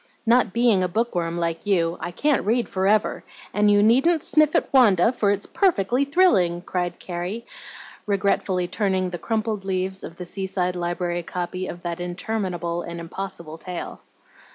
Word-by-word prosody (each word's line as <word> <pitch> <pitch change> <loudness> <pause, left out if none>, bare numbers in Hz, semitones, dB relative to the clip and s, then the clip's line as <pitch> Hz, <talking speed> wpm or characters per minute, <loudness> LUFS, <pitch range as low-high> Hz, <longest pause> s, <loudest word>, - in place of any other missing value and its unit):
"Not 235 -2 +4
being 235 -4 +3
a 185 - +1
book 230 +7 -1
worm 170 -1 -2
like 170 +2 -2
you, 170 -4 +2
I 175 - -4
can't 285 +10 +1
read 235 +4 +1
forever, 195 +3 +1 0.3
and 210 0 +3
you 205 0 +5
needn't 270 +9 +4
sniff 305 -1 +3
at - - +1
'Wanda,' 225 -6 +5
for 220 -5 0
it's 205 0 0
perfectly 275 - +1
thrilling!" 210 - +3
cried 175 -1 -2
Carrie, 180 +6 -5 0.6
regretfully 195 -2 +1
turning 190 -1 0
the 175 - -5
crumpled 220 -2 -2
leaves 190 0 -2
of 165 - -8
the 180 - -7
Seaside 185 -1 -2
Library 175 0 -2
copy 180 +2 -4
of 175 - -8
that 170 0 -4
interminable 175 -1 -3
and 170 0 -7
impossible 170 -2 -7
tale. 180 0 -7
190 Hz, 160 wpm, -23 LUFS, 175-220 Hz, 0.6 s, you